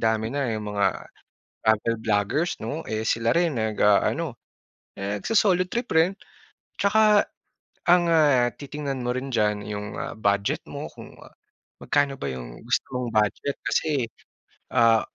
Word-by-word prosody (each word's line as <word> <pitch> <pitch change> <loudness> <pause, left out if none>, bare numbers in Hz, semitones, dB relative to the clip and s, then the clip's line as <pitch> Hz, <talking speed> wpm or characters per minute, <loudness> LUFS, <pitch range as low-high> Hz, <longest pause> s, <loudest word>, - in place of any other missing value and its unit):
dami 110 0 +1
na 140 -3 0
yung 105 -1 -4
mga 100 - +1 0.6
travel 110 +1 +2
vloggers, 110 - +1
'no? 155 +3 -4
Eh, 110 0 -2
sila 115 +1 +1
rin 170 -2 +2
nag-aano, 110 +7 +2 0.6
nagso-solo 180 - +1
trip 240 +5 -3
rin. 165 +4 +3 0.6
Tsaka 210 0 +4 0.6
ang, 175 0 +6
ah, 145 -7 +4
titingnan 140 -2 -5
mo 120 - -2
rin 130 0 -4
diyan 105 -2 +1
yung, 105 -1 -5
ah, - - -4
budget 100 -1 0
mo - - -6
kung - - -12 0.7
magkano 145 -1 +1
ba - - -2
yung - - -8
gusto - - 0
mong 125 -1 -2
budget 105 +6 +1
kasi, 145 -6 +1 0.7
ah, 115 -2 +5
120 Hz, 135 wpm, -25 LUFS, 105-160 Hz, 0.7 s, ang